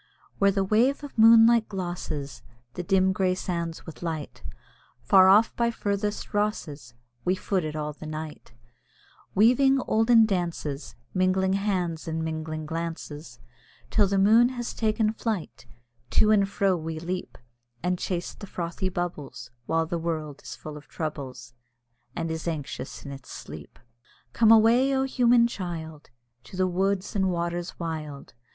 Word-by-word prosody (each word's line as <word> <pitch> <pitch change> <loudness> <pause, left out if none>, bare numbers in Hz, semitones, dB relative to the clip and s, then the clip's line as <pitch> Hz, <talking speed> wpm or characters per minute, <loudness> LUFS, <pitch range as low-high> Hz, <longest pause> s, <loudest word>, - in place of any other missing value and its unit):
Where 200 - +5
the 195 0 +1
wave 235 +9 +2
of 290 - -9
moonlight 225 0 +6
glosses 160 - -5 0.3
The 180 - -4
dim 190 +1 +2
grey 185 -1 +1
sands 170 -3 -4
with 165 - -10
light, 160 -3 -5 0.6
Far 190 -2 +6
off 210 +4 +5
by 235 -1 +1
furthest 205 -2 -3
Rosses 155 - -2 0.3
We 180 +1 +1
foot 190 -1 -1
it 155 0 -4
all 150 -1 -3
the 155 +1 -10
night, 155 -3 -7 0.8
Weaving 260 +6 +5
olden 225 0 +4
dances, 170 -7 -3 0.2
Mingling 190 +1 +2
hands, 185 -5 -1
and 160 0 -2
mingling 155 -1 -4
glances, 165 -1 -6 0.5
Till 210 -2 +4
the 195 +1 0
moon 220 +5 +6
has 245 -2 -5
taken 220 -1 +1
flight; 200 - -4 0.4
To 215 - +4
and 200 -2 +3
fro 195 -1 +1
we 160 -1 -5
leap, 180 +2 -5 0.5
And 180 0 0
chase 175 -2 -3
the 200 - -10
frothy 180 +2 -3
bubbles, 150 -9 -5 0.2
While 165 0 +1
the 170 +1 -3
world 155 -3 -4
is - - -8
full 155 -1 -9
of 150 - -14
troubles. 140 -6 -6 0.6
And 165 -1 -2
is 160 +1 -4
anxious 150 -5 -5
in 140 - -6
its 135 -2 -10
sleep. - - -10 0.6
Come 225 -2 +4
away! 235 +5 +5
O, 265 - +2
human 245 -3 +4
child! 165 -8 -6 0.4
To 185 - -10
the 185 - +2
woods 190 +2 -1
and 190 -2 +2
waters 175 0 -3
wild. 155 -4 -6
180 Hz, 150 wpm, -26 LUFS, 160-210 Hz, 0.8 s, moonlight